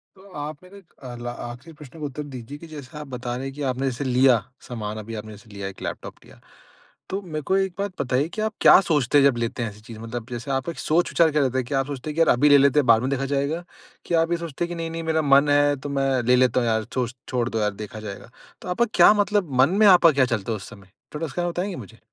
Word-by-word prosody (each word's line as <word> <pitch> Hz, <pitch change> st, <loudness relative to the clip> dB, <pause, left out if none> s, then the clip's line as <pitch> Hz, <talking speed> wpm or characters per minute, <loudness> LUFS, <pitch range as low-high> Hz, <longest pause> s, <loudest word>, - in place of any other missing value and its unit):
तो 195 Hz, +1 st, -17 dB
आप 150 Hz, +2 st, -6 dB
मेरा 195 Hz, +2 st, -14 dB, 0.3 s
अ, 120 Hz, -, -7 dB
ल -, -, -5 dB, 0.2 s
आखिरी 130 Hz, +7 st, -11 dB
प्रश्न 150 Hz, +2 st, -12 dB
का 150 Hz, -, -4 dB
उत्तर 145 Hz, +2 st, -5 dB
दीजिए 130 Hz, +3 st, -8 dB
कि 165 Hz, -, -10 dB
जैसे 150 Hz, -2 st, -10 dB
आप 150 Hz, -, -7 dB
बता 120 Hz, -1 st, -4 dB
रहे 130 Hz, -, -5 dB
हैं 135 Hz, -, -5 dB
कि 145 Hz, -, -7 dB
आपने 130 Hz, +2 st, -2 dB
जैसे 120 Hz, +4 st, -5 dB
लिया 130 Hz, 0 st, +4 dB, 0.3 s
सामान 110 Hz, -3 st, -5 dB
अभी 115 Hz, +2 st, -8 dB
आपने 110 Hz, +1 st, -9 dB
जैसे 105 Hz, +1 st, -16 dB
लिया 100 Hz, -1 st, -6 dB
एक -, -, -17 dB
लैपटॉप -, -, -6 dB
लिया। -, -, -17 dB, 0.7 s
तो 195 Hz, +2 st, -3 dB
मेरे 155 Hz, -, -2 dB
को 190 Hz, -, +3 dB
एक 190 Hz, -2 st, 0 dB
बात 200 Hz, -1 st, -2 dB
बताइए 130 Hz, +2 st, 0 dB
कि 215 Hz, -, -2 dB
आप 220 Hz, 0 st, -1 dB
क्या -, -, +8 dB
सोचते 145 Hz, -3 st, +2 dB
हैं 140 Hz, -, +6 dB
जब 135 Hz, -4 st, +3 dB
लेते 115 Hz, +1 st, -3 dB
हैं 115 Hz, -, -2 dB
ऐसी 105 Hz, +1 st, -15 dB
चीज़ 110 Hz, -2 st, -9 dB
मतलब 115 Hz, 0 st, -6 dB
जैसे 120 Hz, +3 st, -5 dB
आपका 135 Hz, +6 st, -4 dB
एक -, -, -10 dB
सोच-विचार 165 Hz, 0 st, +2 dB
क्या 150 Hz, 0 st, +2 dB
रहता 130 Hz, -1 st, 0 dB
है? 130 Hz, -, +1 dB
क्या 135 Hz, +2 st, -1 dB
आप 135 Hz, -, 0 dB
सोचते 140 Hz, +2 st, -6 dB
हैं 150 Hz, -, -5 dB
कि -, -, -3 dB
यार 165 Hz, -, +4 dB
अभी 145 Hz, +4 st, +4 dB
ले 145 Hz, -, +8 dB
लेते 140 Hz, +1 st, +4 dB
हैं 140 Hz, -, +1 dB
बाद 115 Hz, -, +4 dB
में 130 Hz, -, -1 dB
देखा 135 Hz, +1 st, -2 dB
जाएगा? 140 Hz, +5 st, -1 dB, 0.4 s
कि -, -, -4 dB
आप 165 Hz, +1 st, -1 dB
ये 170 Hz, -, +2 dB
सोचते 165 Hz, +1 st, -3 dB
हैं -, -, -10 dB
कि 175 Hz, -, -5 dB
नहीं-नहीं 165 Hz, 0 st, -4 dB
मेरा 160 Hz, -, +2 dB
मन 140 Hz, +1 st, +5 dB
है 145 Hz, 0 st, +4 dB
तो -, -, -3 dB
मैं 135 Hz, -, +1 dB, 0.2 s
ले -, -, +7 dB
लेता 125 Hz, -1 st, +3 dB
हूँ 120 Hz, -, 0 dB
यार 110 Hz, -1 st, +1 dB
छो 125 Hz, -2 st, -1 dB, 0.2 s
छोड़ 125 Hz, -2 st, -1 dB
दो 110 Hz, -, -2 dB
यार 105 Hz, -, +1 dB
देखा 110 Hz, +1 st, -8 dB
जाएगा। 100 Hz, -, -9 dB, 0.3 s
तो -, -, -8 dB
आपका 235 Hz, +7 st, +2 dB
क्या -, -, +7 dB
मतलब 205 Hz, -6 st, 0 dB
मन 135 Hz, -, +5 dB
में 210 Hz, -, +8 dB
आपका 175 Hz, -3 st, +7 dB
क्या 130 Hz, -, +6 dB
चलता 105 Hz, +2 st, -5 dB
है 110 Hz, -, 0 dB
उस 95 Hz, -, -9 dB
समय? 100 Hz, -4 st, -15 dB, 0.3 s
थोड़ा 155 Hz, +2 st, -2 dB
उसका 175 Hz, +4 st, -3 dB
बताएँगे 180 Hz, +3 st, -3 dB
मुझे? 115 Hz, +4 st, -18 dB
140 Hz, 280 wpm, -23 LUFS, 120-165 Hz, 0.7 s, क्या